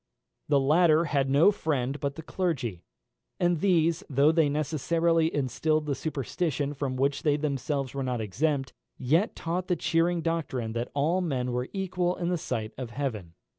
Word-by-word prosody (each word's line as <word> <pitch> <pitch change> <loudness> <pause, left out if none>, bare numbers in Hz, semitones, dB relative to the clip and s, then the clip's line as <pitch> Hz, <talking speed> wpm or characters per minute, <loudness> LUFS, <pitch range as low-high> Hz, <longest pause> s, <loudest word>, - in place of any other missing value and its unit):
The 145 -2 +4
latter 155 +3 +4
had 140 -3 0
no 145 +9 +6
friend 145 -7 -2
but 140 -1 -2
the 160 - -8
clergy, 130 - -2 0.6
and 175 -2 +2
these, 170 -2 +2
though 140 +2 +4
they 160 -3 +3
necessarily 165 +2 +1
instilled 150 +3 0
the 145 - -1
superstition 145 0 -2
from 135 -2 -3
which 140 +2 0
they 150 -3 +2
themselves 140 -2 -2
were 140 - -3
not 125 -2 -2
exempt, 135 +6 -1 0.2
yet 160 - +1
taught 175 +2 -3
the 180 - +2
cheering 170 0 +1
doctrine 135 -9 -2
that 120 +1 -3
all 160 +6 +2
men 130 -7 -1
were 125 +1 -2
equal 180 -2 -1
in 175 -1 -2
the 180 -2 0
sight 110 -7 -3
of 125 -3 -4
heaven. 110 -10 -4
150 Hz, 170 wpm, -28 LUFS, 135-165 Hz, 0.6 s, no